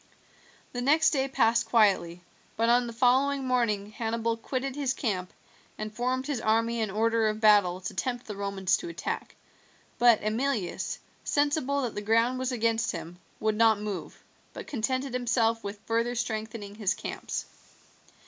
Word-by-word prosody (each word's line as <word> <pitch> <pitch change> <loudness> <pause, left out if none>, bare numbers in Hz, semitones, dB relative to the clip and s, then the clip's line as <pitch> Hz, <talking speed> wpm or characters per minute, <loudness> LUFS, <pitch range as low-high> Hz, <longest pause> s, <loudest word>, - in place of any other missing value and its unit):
The 245 - -3
next 305 +5 +4
day 270 -2 +1
passed 230 -3 +2
quietly, 190 -6 +3 0.3
but 230 +1 +2
on 240 0 +4
the - - -5
following 265 +3 +2
morning 220 -5 0
Hannibal 230 +1 -1
quitted 260 +3 -3
his 275 -2 -1
camp 185 -7 -2 0.5
and 215 0 -5
formed 255 +3 -1
his 280 -6 -2
army 230 +2 +1
in 220 -2 0
order 225 +2 +2
of 215 0 -1
battle 205 -5 +5
to 180 - -5
tempt 245 -1 -3
the 210 - -6
Romans 195 -1 0
to 345 - -7
attack; 335 - -5 0.6
but 240 -2 +7
Emilius, 220 -3 -1 0.3
sensible 285 -1 +1
that 240 - -2
the 205 - -4
ground 230 +4 +2
was 260 0 -1
against 230 -2 +1
him, 170 +1 -7 0.2
would 215 0 +1
not 220 -1 +4
move, 210 -3 -6 0.3
but - - -7
contented 260 0 -2
himself 230 -2 +1
with 200 +1 -5
further 230 +2 0
strengthening 220 -3 -4
his 205 -3 0
camps. - - -5
230 Hz, 160 wpm, -28 LUFS, 215-255 Hz, 0.6 s, but